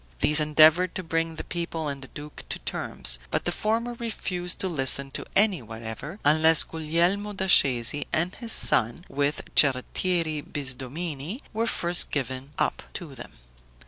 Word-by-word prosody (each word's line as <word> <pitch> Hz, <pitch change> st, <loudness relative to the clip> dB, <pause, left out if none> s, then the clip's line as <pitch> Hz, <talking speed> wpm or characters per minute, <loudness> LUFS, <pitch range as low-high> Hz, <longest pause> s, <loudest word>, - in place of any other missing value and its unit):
These 150 Hz, +1 st, +6 dB
endeavored 155 Hz, +4 st, +4 dB
to 185 Hz, -, -4 dB
bring 165 Hz, 0 st, -2 dB
the -, -, -6 dB
people 170 Hz, -2 st, -4 dB
and 140 Hz, -1 st, -5 dB
the 130 Hz, -, -9 dB
duke 145 Hz, +3 st, -10 dB
to -, -, -3 dB
terms; -, -, -1 dB
but -, -, -2 dB
the -, -, 0 dB
former 230 Hz, +3 st, -1 dB
refused 190 Hz, -7 st, -4 dB
to 190 Hz, -, +1 dB
listen 135 Hz, -4 st, +2 dB
to -, -, -2 dB
any 200 Hz, -6 st, +4 dB
whatever, 115 Hz, -, -8 dB
unless 160 Hz, +2 st, +4 dB
Guglielmo 170 Hz, +6 st, -1 dB
da 190 Hz, -1 st, -3 dB
Scesi 135 Hz, -5 st, +3 dB
and 170 Hz, +4 st, 0 dB
his 235 Hz, -2 st, -2 dB
son, 120 Hz, -, +2 dB
with 145 Hz, +1 st, -1 dB
Cerrettieri 155 Hz, +4 st, +2 dB
Bisdomini, 145 Hz, -, -5 dB
were 225 Hz, +2 st, -1 dB
first 175 Hz, -4 st, +1 dB
given 130 Hz, -1 st, -4 dB
up -, -, -1 dB
to 165 Hz, -6 st, -6 dB
them. 130 Hz, -, -10 dB
160 Hz, 155 wpm, -26 LUFS, 140-180 Hz, -, These